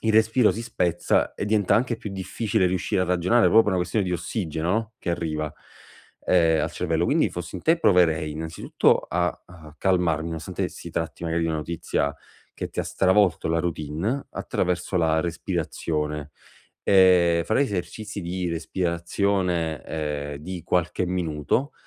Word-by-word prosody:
il 110 -1 +2
respiro 110 +2 +4
si 115 - -5
spezza, 90 -7 0
e - - -3
diventa 105 -2 +2
anche 115 +1 +1
più 105 - -7
difficile 95 0 0
riuscire 90 +1 0
a - - +1
ragionare 90 +6 +2
proprio 110 - +6
per - - -2
una - - +1
questione 95 +3 0
di 90 - -2
ossigeno 85 -1 -2
no, 110 +2 -1
che 85 - -3
arriva, 75 -3 -2 0.7
ehm, 80 -3 +4
al - - -1
cervello. 85 -1 0
Quindi - - +2
fossi 90 +1 -6
in - - -8
te 165 +1 +3
proverei 80 - +3
innanzitutto 80 +2 +1
a 90 +1 +1 0.2
a 80 -4 -14
calmarmi, 90 -4 +1
nonostante 80 -2 -3
si - - -9
tratti - - -4
magari 85 0 0
di 80 - 0
una 80 - -1
notizia 75 -2 -2 0.4
che - - -5
ti - - -2
ha - - -3
stravolto 95 -4 +2
la 85 0 +2
routine, 85 - -2
attraverso 90 +1 -2
la 80 -2 +2
respirazione, 75 -3 -3 0.5
e 90 -3 +5
farei 135 +6 +3
esercizi 105 0 -4
di 90 +1 -3
respirazione, 85 0 -1
ehm, 75 -2 -3
di 85 +3 -7
qualche 90 0 0
minuto, 90 - -1
85 Hz, 160 wpm, -25 LUFS, 80-95 Hz, 0.7 s, proprio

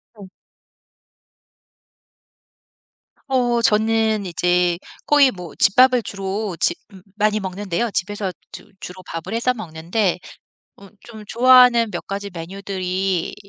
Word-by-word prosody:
어. 200 -3 -12 3.0
어 245 -3 +1
저는 220 -1 +1
이제 175 0 +1 0.3
거의 285 -3 +5
뭐 180 -7 -10
집밥을 250 +3 +4
주로 195 0 -4
지 - - +2 0.2
음. 190 -2 -14
많이 215 0 +1
먹는데요. 195 +3 -3
집에서 200 0 -3 0.2
주 - - -12
주로 185 +1 -9
밥을 165 +5 -6
해서 235 +2 +1
먹는데 180 0 -2 0.6
어 200 - -15 0.2
좀 220 -2 -11
좋아하는 245 -1 +5
몇 175 - -6
가지 200 0 -5
메뉴들이 185 +1 -3
200 Hz, 215 characters per minute, -20 LUFS, 185-225 Hz, 3.0 s, 거의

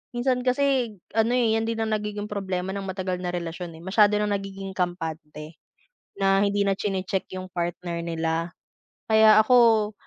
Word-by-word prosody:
Minsan 250 0 0
kasi 255 -3 +1 0.2
ano, 225 +1 +3
eh, 235 -3 +2
'yan 225 - 0
din 225 0 -2
ang 220 0 -1
nagiging 210 0 -4
problema 190 -2 -3
ng 200 - -4
matagal 185 -1 -3
na 175 - -2
relasyon, 170 0 -5
eh. - - -14
Masiyado 205 +2 +4
ng 210 0 0
nagiging 195 -1 -6
kampante 160 -3 -4 0.6
na 195 0 +3
hindi 200 0 +1
na 195 - +2
chine-check 190 -1 -3
'yong 185 0 -6
partner 170 0 -3
nila. 165 0 -2 0.6
Kaya 220 0 +7
ako 225 -3 +4
195 Hz, 160 wpm, -25 LUFS, 180-220 Hz, 0.6 s, Kaya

